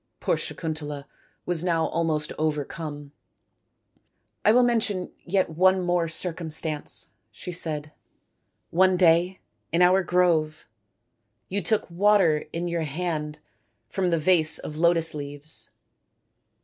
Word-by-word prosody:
Poor - - +1
Sakuntala 150 -3 -5 0.4
was 175 -2 -1
now 165 -3 +1
almost 155 -2 -1
overcome. 150 -1 -3 0.7
" - - -46
I 210 - +6
will 250 +2 +5
mention 220 -6 0
yet 185 -1 +1
one 185 +3 +4
more 175 -2 0
circumstance," 160 -2 -3 0.2
she 180 - -7
said. 155 -3 -3 0.4
" - - -49
One 185 -1 +5
day 175 +1 +3 0.3
in 170 +2 +3
our 185 +2 +5
grove 170 -4 +1 0.8
you 200 +2 -1
took 205 +5 0
water 180 -4 +3
in 170 +1 -3
your 170 -1 -1
hand 155 -1 -3 0.5
from 185 - -1
the 170 - +2
vase 160 -1 +4
of 150 - -6
lotus 165 0 +2
leaves." 145 +1 -8
165 Hz, 125 wpm, -25 LUFS, 155-180 Hz, 0.8 s, I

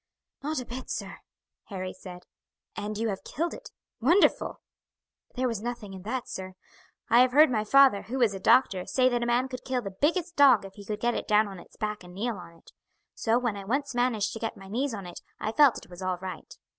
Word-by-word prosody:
"Not 300 0 -2
a 250 - -6
bit, 255 +2 -7
sir," - - -5 0.5
Harry 185 -2 -5
said. 180 -1 -11 0.5
"And 210 0 -4
you 225 +1 0
have 195 -2 -4
killed 335 +4 -3
it - - -10 0.3
wonderful!" 335 - +3 0.8
"There 255 +1 0
was 230 -4 -3
nothing 235 -4 -5
in 190 - -8
that, 235 +5 -4
sir. 185 0 -7 0.6
I 235 - +7
have 250 0 +5
heard 300 0 +7
my 215 -3 +1
father, 265 -2 +5
who 260 +4 -5
is 230 -5 +3
a 195 - -5
doctor, 190 -3 +3
say 255 -1 +3
that 240 -1 0
a 235 - -1
man 245 +2 +2
could 255 -1 -7
kill 255 -2 -2
the 195 - -5
biggest 335 - 0
dog 260 -8 +6
if 195 - -10
he 205 -2 -12
could 210 +1 -4
get 240 0 +2
it - - -4
down 210 0 +4
on 195 -2 -9
its - - -16
back 210 -2 -3
and 180 0 -13
kneel 225 +2 -2
on 175 -2 -11
it. 165 - -20 0.4
So 225 +1 +1
when 240 -4 -1
I 200 - -7
once 275 +7 -1
managed 240 -4 0
to 225 - -6
get 225 0 -4
my 195 - -12
knees 250 +3 -1
on 200 -2 -7
it 175 - -9 0.2
I 215 - -2
felt 285 0 +5
it - - -12
was 175 +1 -10
all 185 -1 -1
right." 185 +1 -8
225 Hz, 235 wpm, -28 LUFS, 195-255 Hz, 0.8 s, I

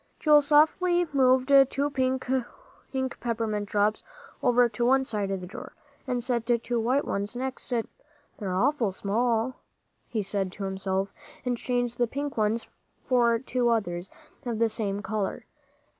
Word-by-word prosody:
Joel 300 -1 +6
softly 325 +4 +3
moved 260 0 +3 0.2
two 285 +1 -1
pink 260 -1 0 0.9
peppermint 220 -3 -2
drops 210 +1 +1 0.4
over 245 -1 +4
to 235 +1 -3
one 265 +2 +4
side 210 -5 -2
of 195 -1 -2
the - - -6
drawer, 180 - -9 0.3
and 245 -2 -1
set 240 -2 -1
two 240 0 +1
white 255 +5 +1
ones 200 +4 -3
next 260 +1 -4
to 250 - 0
them. - - -21 0.5
"They're 190 -4 -2
awful 240 0 +2
small," 225 +5 0 0.5
he 220 -4 -2
said 195 -1 -2
to 205 - -6
himself, 190 0 -2 0.3
and 250 -1 +1
changed 245 0 -2
the 240 - +3
pink 285 +4 -4
ones 220 +1 0 0.4
for 240 -2 +3
two 245 0 0
others 180 -6 -1 0.3
of 240 -4 -3
the 230 0 +2
same 205 -2 -2
color. 215 -3 -3
235 Hz, 155 wpm, -27 LUFS, 210-255 Hz, 0.9 s, Joel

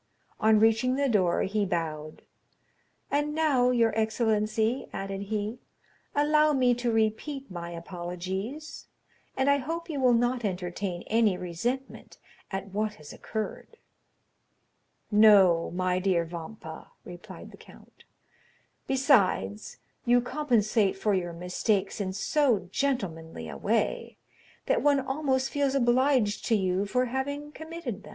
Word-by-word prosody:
On 220 0 +4
reaching 225 +4 +3
the 280 +1 +1
door, 190 -8 +2
he 210 +2 0
bowed. 155 -5 -3 0.9
"And 295 +1 0
now, 280 -6 +3
your 235 -3 +2
excellency," 220 +1 0
added 195 0 -5
he, 215 +2 -3 0.6
"allow 300 +1 +4
me 255 -3 +3
to 245 0 -1
repeat 225 +5 -1
my 170 -1 -6
apologies, 185 - -6 0.5
and 265 +1 +1
I 280 0 +5
hope 330 +5 -4
you 290 - -3
will 250 -2 +4
not 245 +1 +1
entertain 180 -1 -3
any 220 -4 +2
resentment 235 +11 -4 0.3
at 195 0 -5
what 210 +1 -1
has 150 -1 -12
occurred." 220 - -6 1.3
"No, 200 -6 +6
my 185 +1 0
dear 180 -3 +1
Vampa," 165 0 -9 0.2
replied 175 0 -10
the - - -14
count; - - -18 0.8
"besides, 215 - +2 0.3
you 245 +1 +4
compensate 235 -7 +1
for 210 +1 +1
your 175 -2 -1
mistakes 185 +4 -1
in 190 -1 -2
so 225 -2 +1
gentlemanly 165 - -2
a 75 - -7
way, - - -1 0.5
that - - +1
one 285 0 +4
almost 265 -1 -1
feels 280 -2 0
obliged 250 -3 +2
to 230 - +3
you 190 0 0
for 250 +4 +1
having 285 +4 -4
committed 315 - -7
them." 205 - -13
220 Hz, 130 wpm, -28 LUFS, 185-265 Hz, 1.3 s, No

